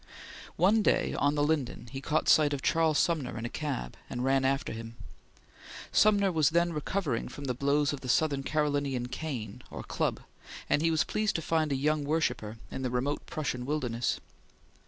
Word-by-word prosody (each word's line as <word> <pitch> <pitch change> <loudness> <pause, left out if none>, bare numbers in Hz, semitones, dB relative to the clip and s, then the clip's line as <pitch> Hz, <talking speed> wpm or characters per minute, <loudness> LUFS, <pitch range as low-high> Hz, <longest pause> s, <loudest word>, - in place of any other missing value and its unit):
One 200 +6 +4
day - - +2
on 145 +1 +1
the 145 - +2
Linden 145 -6 -1
he 135 0 -5
caught 155 +2 0
sight 150 -2 +5
of 140 - -3
Charles 160 -2 +3
Sumner 155 -7 0
in 115 - -4
a - - -3
cab, 135 - -4
and 125 - -3
ran 135 0 +2
after 135 0 0
him. 115 +1 -8 1.0
Sumner 200 -2 +4
was 155 -3 +3
then 170 +1 +2
recovering 150 -4 -2
from 145 +3 -8
the 130 -2 -1
blows 140 +3 +1
of 140 - -6
the 130 - -6
South 140 0 +2
Carolinian 145 -5 0
cane 125 -7 -5
or - - -7
club, - - -1 0.5
and 145 - +2
he 165 - +3
was 160 -1 +3
pleased 215 -1 -1
to 165 - 0
find 160 -2 +1
a - - +2
young 150 +2 +1
worshipper 140 -8 -1
in - - -4
the 130 - -1
remote 125 +4 -2
Prussian 130 -5 -3
wilderness. 125 -4 -1
145 Hz, 185 wpm, -30 LUFS, 130-155 Hz, 1.0 s, sight